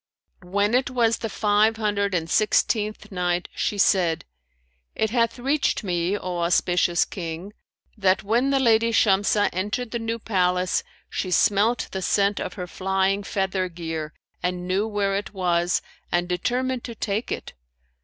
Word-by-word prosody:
When 200 +4 0
it 260 +2 +2
was 235 -3 +2
the 225 - -3
Five 215 +2 +2
Hundred 200 -3 0
and 165 -2 -1
Sixteenth 215 +3 +1
Night, 180 -1 -1
She 205 - -1
said, 175 -5 +2 0.7
It 220 -1 0
hath 230 0 +1
reached 275 0 0
me, 180 +1 0
O 180 -3 -4
auspicious 175 0 +2
King, 175 +2 -6 0.4
that 190 -3 +2
"when 235 +6 +2
the 275 -1 +2
lady 230 -2 +3
Shamsah 205 -1 +3
entered 210 +6 -2
the 235 - -2
new 225 0 -2
palace, 180 -4 +1 0.3
she 185 - -3
smelt 210 +6 +2
the 190 - -3
scent 200 +2 +2
of - - -4
her 180 - -4
flying 190 +2 0
feather 190 -2 -1
gear 165 -3 -5 0.3
and 180 0 -2
knew 195 +4 +1
where 200 -2 0
it 200 0 -4
was 175 -1 +1 0.3
and 175 0 +1
determined 245 +8 -1
to 235 - -7
take 210 +2 -2
it. - - -5
200 Hz, 155 wpm, -24 LUFS, 180-220 Hz, 0.7 s, lady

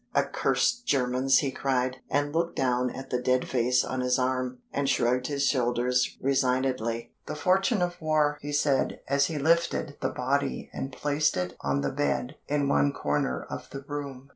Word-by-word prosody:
"Accursed 240 0 +1
Germans!" 130 0 +3
he 140 -3 +1
cried, 130 -1 0
and 145 +1 0
looked 170 +1 0
down 125 -1 +1
at 135 +2 -8
the 125 -1 0
dead 130 0 +1
face 125 0 +2
on 130 0 -3
his 125 0 +2
arm, 130 0 -1 0.2
and 140 -1 0
shrugged 125 -1 +2
his 140 -1 0
shoulders 125 -1 +1
resignedly. 125 -3 0
"The 150 - -4
fortune 190 +5 +2
of 175 -1 -3
war!" 150 -2 +2
he 145 - -5
said 145 -2 +1
as 140 +1 +3
he 160 - -3
lifted 165 -1 +1
the - - +1
body 140 +2 -1
and 135 - -4
placed 145 0 0
it 90 0 -2
on 70 0 0
the 70 - -1
bed 125 - -1
in 145 -1 +1
one 140 0 +3
corner 65 - -1
of - - -7
the 135 - -7
room. 140 -2 -6
135 Hz, 175 wpm, -27 LUFS, 125-145 Hz, 0.2 s, Germans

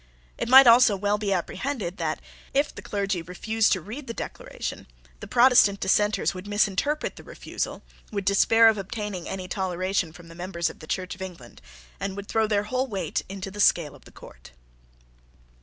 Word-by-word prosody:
It - - -4
might 265 +1 +10
also 235 -2 +7
well 205 +2 0
be 205 -2 -2
apprehended 195 +1 -3
that, 155 -2 -2 0.4
if 285 +2 +1
the - - -9
clergy 200 -3 -2
refused 215 +6 0
to 185 - -2
read 245 - -8
the 230 - -5
Declaration, - - -6 0.3
the - - -9
Protestant 240 -5 +5
Dissenters 210 +2 +1
would 185 +2 -9
misinterpret 210 +8 0
the - - -11
refusal, - - -5 0.3
would 200 -2 -3
despair 225 +3 +5
of 220 -2 +3
obtaining 200 -2 -5
any 185 -1 -5
toleration 185 -2 -1
from 170 +1 -14
the 165 - -12
members 170 -1 -3
of - - -19
the 155 - -12
Church 185 +1 -3
of 190 - -13
England, 175 -11 -9 0.4
and 195 -1 -3
would 200 0 -7
throw 220 -1 +1
their 205 -1 +1
whole 255 +5 -1
weight 200 -6 -2
into 195 0 -6
the 205 - -10
scale 165 -7 +3
of - - -17
the - - -15
court. - - -15
200 Hz, 185 wpm, -25 LUFS, 185-220 Hz, 0.4 s, might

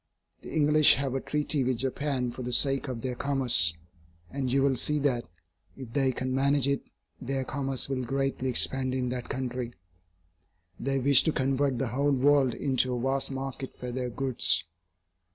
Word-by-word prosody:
The - - -10
English 150 0 +5
have 135 -2 -2
a 135 - -2
treaty 150 -1 -1
with 125 -1 0
Japan 130 -1 -2
for 130 - -8
the 125 0 -4
sake 135 +3 +2
of 125 -3 -5
their 130 0 -3
commerce, 125 -10 +3 0.6
and 135 -2 -3
you 135 +1 +2
will 135 -1 +2
see 150 +4 +1
that, 135 -5 0 0.5
if 130 -4 -10
they 135 -1 +2
can 130 +1 -3
manage 140 0 +2
it, 140 0 0 0.4
their 135 +1 -2
commerce 135 0 -2
will 135 -2 -3
greatly 135 +1 -2
expand 130 +1 +1
in 125 -1 -1
that 125 -1 -5
country. 125 -2 -4 1.0
They 135 +1 -1
wish 135 0 +5
to 160 - +2
convert 135 -1 0
the 130 0 -2
whole 140 +4 0
world 135 -1 +3
into 130 -2 0
a - - -3
vast 135 +2 -1
market 135 0 -6
for 125 0 -6
their 125 0 -3
goods. 115 -8 +2
130 Hz, 175 wpm, -28 LUFS, 125-140 Hz, 1.0 s, English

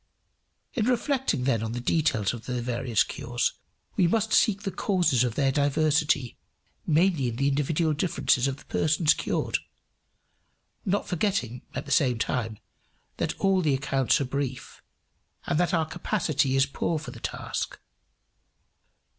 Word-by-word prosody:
In 230 -5 0
reflecting 255 - +1
then 125 -4 +1
on 110 0 -3
the 120 - -3
details 120 -7 +1
of 115 -2 -9
the 125 -1 -2
various 120 -2 +1
cures 120 0 -2 0.4
we 180 - +4
must 220 +4 +1
seek 205 -1 +3
the 195 - -2
causes 180 - +2
of 120 -3 -1
their 135 -2 +2
diversity 145 -2 +1 0.5
mainly 160 -3 +3
in 120 - -3
the 140 +3 +1
individual 150 +3 +1
differences 145 -5 +1
of 135 0 -2
the - - -17
persons 155 0 +2
cured, - - -1 1.3
not 200 +1 0
forgetting, 180 - -1
at - - -4
the 140 - -8
same 125 -3 +3
time, 115 -2 -2 0.6
that - - -2
all 195 -1 +3
the 150 -5 +2
accounts 135 +1 +1
are 140 - 0
brief, 130 -1 -4 0.6
and 150 - 0
that 175 - +2
our 165 -2 +2
capacity 155 -5 0
is 135 0 +4
poor 155 +4 -2
for 150 -5 -7
the 120 - -11
task. - - -4
140 Hz, 150 wpm, -27 LUFS, 125-175 Hz, 1.3 s, we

